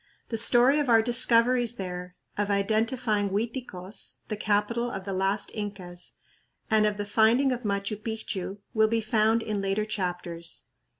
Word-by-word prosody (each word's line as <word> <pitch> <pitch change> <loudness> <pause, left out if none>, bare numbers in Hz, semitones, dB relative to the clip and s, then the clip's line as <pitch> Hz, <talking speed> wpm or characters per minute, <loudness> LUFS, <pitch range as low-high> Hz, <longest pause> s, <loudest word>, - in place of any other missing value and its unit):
The 225 - -2
story 245 +5 +5
of 285 -3 -1
our 225 -1 +5
discoveries 240 0 +3
there, 180 -2 -6 0.2
of 205 0 -1
identifying 215 +1 0
Uiticos, 210 -2 -3
the 215 - -1
capital 210 +4 0
of 195 -5 -6
the 195 0 -4
last 195 +2 -1
Incas, 195 -4 -7 0.6
and 215 -1 +4
of 210 -1 -2
the 205 - -3
finding 225 +6 +3
of 250 -1 -2
Machu 200 -1 -2
Picchu 210 -3 -4 0.2
will 220 -2 +4
be 225 +1 +1
found 220 +1 +2
in 210 -2 -2
later 195 +2 0
chapters. 175 -5 -4
215 Hz, 155 wpm, -27 LUFS, 195-230 Hz, 0.6 s, story